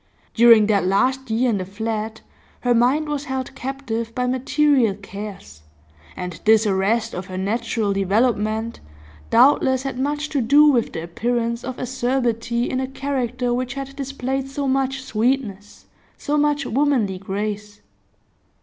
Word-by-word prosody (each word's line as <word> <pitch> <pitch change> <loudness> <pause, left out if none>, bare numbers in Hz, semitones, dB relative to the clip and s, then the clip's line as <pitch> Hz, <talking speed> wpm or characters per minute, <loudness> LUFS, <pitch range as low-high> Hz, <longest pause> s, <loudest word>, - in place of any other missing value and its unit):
During 230 -2 +7
that 205 -2 +2
last 255 +8 +1
year 235 +3 +2
in 205 - 0
the - - -2
flat 220 +3 -4 0.4
her 245 -1 +2
mind 255 +6 +2
was 295 -1 -3
held 265 -1 -4
captive 235 -4 -4
by 250 - 0
material 260 -3 +2
cares, 200 - -9 0.6
and 180 -1 -6
this 220 0 +5
arrest 210 +3 +1
of 180 +1 -5
her 185 -1 -6
natural 210 +1 -1
development 215 +3 0 0.5
doubtless 260 +1 +4
had 270 -2 -4
much 295 +2 -1
to 280 - 0
do 285 +6 +6
with 255 -6 +2
the 160 - -4
appearance 235 +5 -2
of 255 0 -5
acerbity 240 -2 -1
in 255 - -2
a 260 - -2
character 255 -3 -2
which 250 +1 -2
had 275 0 -6
displayed 270 -1 -3
so 275 0 -3
much 270 0 0
sweetness, 220 -4 -2 0.3
so 295 - -2
much 295 -1 +1
womanly 245 -8 +1
grace. 205 +1 -5
240 Hz, 145 wpm, -21 LUFS, 215-265 Hz, 0.6 s, During